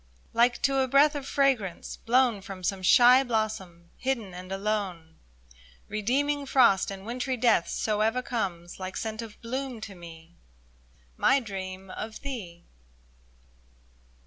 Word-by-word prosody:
Like 240 +1 +3
to 275 -1 +2
a 260 - +2
breath 280 +4 +5
Of 285 -2 -5
fragrance 255 -11 0
blown 240 -3 +2
From 190 -1 -9
some 195 +1 -1
shy 245 +7 +7
blossom, 215 -8 -3
hidden 235 -8 -2
and 180 +1 -9
alone, 195 -5 -3 0.7
Redeeming 275 +7 0
frost 235 -8 +4
and 195 0 -8
wintry 250 +3 -2
death. 230 -7 +3
So 215 -1 -1
ever 225 +4 +1
comes, 185 -9 -4
like 185 0 -5
scent 220 0 -4
of 220 -2 -10
bloom 260 0 -4
to 205 -2 -7
me, 170 -1 -13 0.8
My 275 - +4
dream 190 -4 -7
of 215 +3 -7
thee 200 -12 -7
220 Hz, 135 wpm, -27 LUFS, 190-255 Hz, 0.8 s, shy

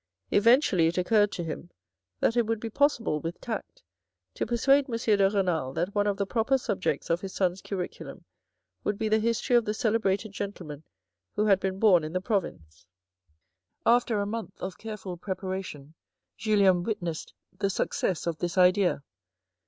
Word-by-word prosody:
Eventually 210 - +4
it 170 - -2
occurred 205 +3 +3
to 175 - -3
him 165 +1 -6 0.5
that 230 - +2
it 235 -2 +2
would 225 -1 -1
be 225 0 -5
possible, 240 - +1
with 165 +3 -5
tact, 225 -4 -6 0.5
to - - -3
persuade 270 +4 +3
M. 230 - -2
de 205 -4 +3
Renal 180 -10 0
that 175 +6 -2
one 205 0 +1
of 200 -1 0
the 200 - 0
proper 230 +6 +1
subjects 205 -9 -2
of 170 +1 +1
his 195 -1 -7
sons' 185 -1 0
curriculum 185 -3 -6 0.6
would 205 - -1
be 220 - -1
the 220 +1 +3
history 230 +3 +1
of 240 - +5
the 210 - -2
celebrated 215 -2 0
gentlemen 180 -8 -6 0.5
who 210 - +1
had 195 -3 +4
been 190 -1 -2
born 195 -6 +5
in 155 +1 -5
the 185 - +1
province. 185 - -4 1.0
After 240 -1 +3
a 200 - 0
month 225 +2 -6
of 185 0 -6
careful 210 -5 -6
preparation 185 -6 -5 0.4
Julien 200 -5 +3
witnessed 175 -5 -4 0.2
the 200 - +1
success 185 -2 -1
of 170 -2 -2
this 175 +1 -3
idea. 180 -4 +4
200 Hz, 170 wpm, -27 LUFS, 180-220 Hz, 1.0 s, of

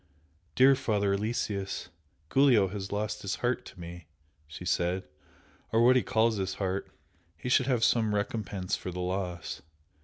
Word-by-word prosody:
"Dear 135 +2 +7
Father 100 -6 +1
Aloysius, 100 -3 -2 0.4
Giulio 125 -8 +5
has 95 0 -5
lost 105 +1 -2
his 100 - -2
heart 120 0 -1
to 95 - -12
me!" 85 0 -9 0.4
she 80 +4 -9
said 90 +1 0 0.7
"Or 115 +1 +4
what 130 +1 +7
he 130 - +5
calls 110 -1 +2
his 95 -1 -2
heart! 95 0 -2 0.5
He 125 - -5
should 125 0 +4
have 125 -4 +2
some 110 -3 +3
recompense 100 -3 -2
for - - -6
the 90 0 -5
loss! 90 -5 -3
100 Hz, 155 wpm, -29 LUFS, 95-115 Hz, 0.7 s, Dear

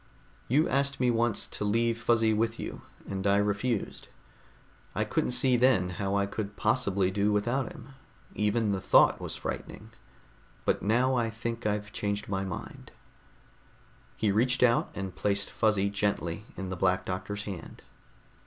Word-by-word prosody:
"You 150 +6 +3
asked 140 0 +1
me 125 -1 +3
once 115 -2 +1
to - - -6
leave 115 +3 +2
Fuzzy 115 -2 +3
with 115 +1 0
you, - - -6 0.3
and 95 0 -2
I 100 0 +4
refused. 105 +2 -1 0.9
I - - +1
couldn't - - 0
see 125 0 +3
then 120 -8 +3
how 100 0 0
I 100 0 +2
could 100 +1 -5
possibly 100 -5 +1
do 100 +2 +1
without 120 +6 0
him; - - -12 0.4
even 105 +1 +1
the 95 -1 -1
thought - - +5
was - - -4
frightening. - - -6 0.7
But - - +1
now 125 +5 +2
I 120 -3 +1
think 115 0 -4
I've 105 0 -2
changed 100 0 -2
my 95 -1 -1
mind." 95 -2 -7 1.3
He 105 - +1
reached 125 +5 +2
out 120 -1 +3
and 95 -2 -5
placed 100 +1 0
Fuzzy 100 -2 +1
gently 100 -2 -1
in 95 -1 -4
the - - -2
Black 90 +1 +1
Doctor's 100 +2 -4
hand. 95 -6 -8
105 Hz, 155 wpm, -29 LUFS, 100-120 Hz, 1.3 s, thought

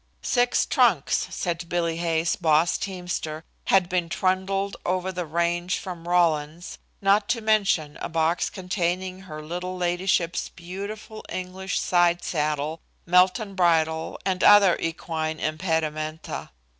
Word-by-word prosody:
Six 245 0 +2
trunks, 220 - +2
said 170 -1 -3
Bill 175 -1 0
Hay's 165 0 0
boss 160 0 +2
teamster, 175 -4 -4 0.2
had 190 -2 +4
been 180 -2 -1
trundled 195 +2 0
over 185 +1 -1
the 180 -2 -4
range 170 +3 0
from 175 -4 -7
Rawlins, 165 -2 0 0.2
not 200 +1 +3
to 235 - +1
mention 200 -9 +1
a - - -3
box 165 +1 +1
containing 185 0 -2
her 155 -5 -9
little 180 +3 -5
ladyship's 175 -1 0
beautiful 200 +5 -8
English 185 +1 -3
side 175 -1 +2
saddle, 150 0 -1 0.2
Melton 185 +3 +3
bridle 160 -3 +1
and 185 -2 0
other 205 -4 +7
equine 160 -1 -3
impedimenta. 155 -1 -2
175 Hz, 120 wpm, -25 LUFS, 160-190 Hz, 0.2 s, other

